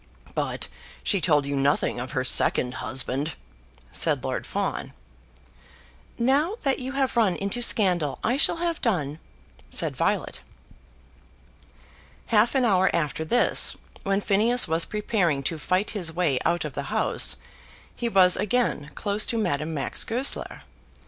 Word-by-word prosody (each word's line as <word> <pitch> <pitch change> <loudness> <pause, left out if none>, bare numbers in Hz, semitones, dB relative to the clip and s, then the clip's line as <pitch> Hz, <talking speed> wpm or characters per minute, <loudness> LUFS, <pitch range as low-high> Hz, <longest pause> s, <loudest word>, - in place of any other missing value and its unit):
"But - - -3 0.4
she 200 -4 +1
told 150 -5 +3
you 140 0 -2
nothing 140 -2 +1
of 125 +1 -6
her 130 -3 0
second 125 -1 +2
husband?" 135 +4 -3 0.6
said 70 - +1
Lord - - -3
Fawn. - - -3 1.2
"Now 280 - +2
that 275 -2 +1
you 260 +1 -5
have 270 -2 0
run 215 -6 +3
into 200 +5 -1
scandal, 180 - +2
I 240 - +1
shall 290 - +3
have 335 -1 -2
done," 160 - -1 0.5
said - - +2
Violet. - - -1 1.9
Half 220 +5 +4
an 260 -2 +3
hour 190 -4 +3
after 160 -1 -1
this, 240 +10 +2 0.3
when 195 +1 0
Phineas 220 +5 +3
was 165 +1 +2
preparing 195 -9 0
to 160 +3 -2
fight 185 +6 0
his 180 -6 -3
way 160 -6 0
out 175 - +1
of - - -5
the - - -4
house, - - +2 0.6
he 235 - -2
was 185 -4 +5
again 215 -10 0
close 205 0 +1
to 235 - -1
Madame 165 -7 -1
Max 140 - -2
Goesler. 250 +5 -3
195 Hz, 140 wpm, -25 LUFS, 150-235 Hz, 1.9 s, was